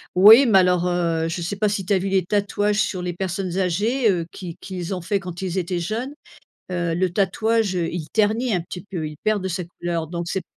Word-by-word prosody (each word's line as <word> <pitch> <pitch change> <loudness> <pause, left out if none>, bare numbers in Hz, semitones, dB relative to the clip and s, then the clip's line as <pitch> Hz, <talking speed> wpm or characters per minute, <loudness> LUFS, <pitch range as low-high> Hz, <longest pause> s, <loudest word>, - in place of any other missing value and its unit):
Oui, 215 +8 +9
mais 215 -6 +5
alors, 180 -1 +2
heu, 170 -2 0
je 165 +2 -3
sais 175 +4 -3
pas 210 +1 +2
si 200 -2 -2
tu 200 - +1
as 190 - +3
vu 195 +2 -2
les 190 -2 +1
tatouages 205 +1 0
sur 185 - -2
les 180 0 -3
personnes 185 0 -3
âgées, 215 +7 +1
heu, 175 -4 0
qu'ils 175 -3 -8
qu'ils 185 0 -5
ont 180 - -5
fait 200 +4 -1
quand 180 -2 -7
ils 190 -1 -3
étaient 180 -1 -1
jeunes, 225 - -3 0.6
heu, 175 -2 -1
le 180 +1 +1
tatouage, 215 +1 +1
heu, 170 -2 0
il 165 -3 -4
ternit 220 +2 +2
un 180 - +1
petit 180 +2 -8
peu, 175 -6 -5
il 150 - -10
perd 215 -2 +1
de 190 - -2
sa 180 0 -3
couleur 170 -1 -4
donc 170 +1 -5
c'est 190 - -2
185 Hz, 240 wpm, -22 LUFS, 175-205 Hz, 0.6 s, Oui